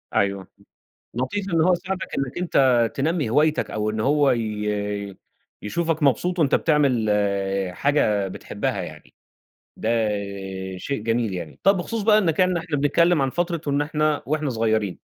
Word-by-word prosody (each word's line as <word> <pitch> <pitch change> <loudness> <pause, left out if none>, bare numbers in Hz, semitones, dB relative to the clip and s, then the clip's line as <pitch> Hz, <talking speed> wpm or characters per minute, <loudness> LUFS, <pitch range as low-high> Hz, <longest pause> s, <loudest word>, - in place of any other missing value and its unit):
أيوه 100 -1 0 0.7
لطيف 130 - -2
إن 165 - +3
هو 180 +3 +4
يساعدك 185 +2 -3
إنّك 135 -1 -3
أنت 130 -10 +3
تنمّي 150 -2 0
هوايتك، 150 +5 +2
أو 105 0 -1
إن 110 0 -3
هو 140 +3 +3
ي 105 -3 -2 0.4
يشوفك 160 +8 -1
مبسوط 175 +7 +1
وأنت 150 -4 +3
بتعمل 140 -8 +2 0.6
حاجة 105 -7 +1
بتحبها 95 - -3
يعني، - - -10 0.6
ده 115 0 0 0.7
شيء 140 +3 -4
جميل 115 -1 0
يعني، 85 -4 -7
طَب 195 +1 +5
بخصوص 215 +5 -3
بقى 215 0 +5
إنّك 170 -6 +1
يعني 185 -1 +3
إحنا 160 -2 -3
بنتكلم 155 +3 +3
عن 135 - 0
فترة 170 +1 -1
وإن 140 0 +1
إحنا 150 0 0
وإحنا 150 0 -1
صغيّرين 110 -4 0
140 Hz, 145 wpm, -23 LUFS, 110-165 Hz, 0.7 s, طَب